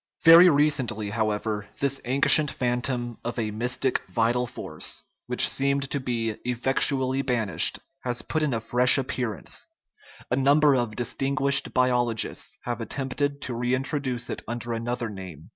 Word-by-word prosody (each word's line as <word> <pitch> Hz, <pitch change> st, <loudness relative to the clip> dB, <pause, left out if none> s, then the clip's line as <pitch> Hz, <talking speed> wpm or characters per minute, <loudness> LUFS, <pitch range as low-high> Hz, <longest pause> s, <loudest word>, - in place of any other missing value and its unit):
Very 170 Hz, +2 st, +9 dB
recently, 135 Hz, -9 st, +1 dB
however, 105 Hz, -1 st, -2 dB
this 140 Hz, -1 st, -1 dB
ancient 140 Hz, +3 st, +5 dB
phantom 120 Hz, -1 st, -2 dB
of 120 Hz, +1 st, -5 dB
a 110 Hz, -2 st, -2 dB
mystic 125 Hz, +4 st, -1 dB
vital 120 Hz, +2 st, 0 dB
force, 80 Hz, -10 st, -5 dB, 0.2 s
which -, -, +5 dB
seemed 140 Hz, 0 st, -1 dB
to 140 Hz, -, 0 dB
be 115 Hz, -4 st, -3 dB
effectually 130 Hz, +2 st, +1 dB
ban 120 Hz, -6 st, -1 dB
ished, -, -, +2 dB, 0.2 s
has 125 Hz, -2 st, -3 dB
put 155 Hz, -, -2 dB
in 150 Hz, -2 st, 0 dB
a -, -, -1 dB
fresh 125 Hz, +4 st, +4 dB
appearance; 125 Hz, -4 st, -3 dB, 0.6 s
a -, -, +3 dB
number 145 Hz, +2 st, +4 dB
of 120 Hz, -4 st, -2 dB
dis 120 Hz, +1 st, -3 dB
tinguished 140 Hz, 0 st, +2 dB
biologists 125 Hz, -3 st, 0 dB
have 120 Hz, -1 st, -4 dB
attempted 140 Hz, +3 st, -3 dB
to 125 Hz, -, -4 dB
reintroduce 125 Hz, +1 st, -2 dB
it -, -, -4 dB
under 120 Hz, 0 st, -4 dB
another 120 Hz, +1 st, -3 dB
name. 95 Hz, -7 st, -10 dB
125 Hz, 145 wpm, -25 LUFS, 115-135 Hz, 0.6 s, Very